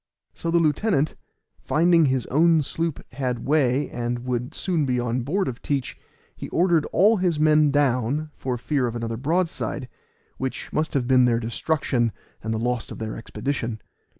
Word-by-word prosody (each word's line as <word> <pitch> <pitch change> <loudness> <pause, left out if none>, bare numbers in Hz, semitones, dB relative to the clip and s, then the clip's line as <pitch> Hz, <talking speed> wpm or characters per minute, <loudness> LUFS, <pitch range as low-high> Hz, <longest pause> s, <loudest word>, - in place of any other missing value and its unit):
So 170 - -4
the 170 - +3
lieutenant, 155 0 +1 0.5
finding 165 0 +3
his 130 -3 +1
own 160 +2 +4
sloop 165 +2 -3
had 125 -3 -3
way 140 -2 +2
and 120 0 -3
would 125 0 -3
soon 175 -5 0
be 125 -3 0
on 120 +1 -1
board 180 +10 -1
of 125 -2 -5
Teach, 140 -3 -2 0.4
he - - -7
ordered 170 -3 +2
all 210 +6 +4
his 180 -5 0
men 155 -1 +5
down, 140 +1 +1
for 125 -2 -3
fear 130 +1 0
of 120 - -4
another 115 -1 -3
broadside, 160 -1 -1 0.5
which 130 0 -4
must 155 -1 -1
have 130 -3 +1
been 130 0 +5
their 120 -1 +2
destruction 120 -1 0 0.3
and 110 - -3
the 110 - 0
loss 120 +1 -2
of - - -8
their 110 -1 -4
expedition. 115 -1 -4
135 Hz, 170 wpm, -24 LUFS, 120-155 Hz, 0.5 s, men